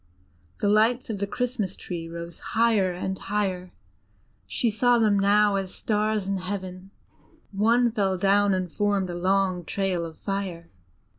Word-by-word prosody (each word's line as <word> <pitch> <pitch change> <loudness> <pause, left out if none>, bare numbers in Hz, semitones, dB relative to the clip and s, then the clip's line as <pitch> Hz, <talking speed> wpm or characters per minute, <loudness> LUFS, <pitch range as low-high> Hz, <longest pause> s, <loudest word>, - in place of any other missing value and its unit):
The 205 - +2
lights 225 +4 +3
of 205 - -4
the 200 - -1
Christmas 220 -3 -2
tree 165 -2 -6
rose 170 0 -8 0.2
higher 220 -5 +3
and 190 +1 -4
higher, 190 -3 -2 0.8
she 230 - +1
saw 240 +3 +3
them 210 -3 +3
now 205 0 +4
as 190 -1 -4
stars 215 -2 0
in 195 0 0
heaven; 185 0 -6 0.6
one 230 +4 +3
fell 195 -4 0
down 200 +1 +3
and 185 -2 -3
formed 200 -2 0
a - - -5
long 185 0 +1
trail 185 -1 -1
of 165 -1 -8
fire. 190 -4 -4
195 Hz, 150 wpm, -25 LUFS, 185-210 Hz, 0.8 s, now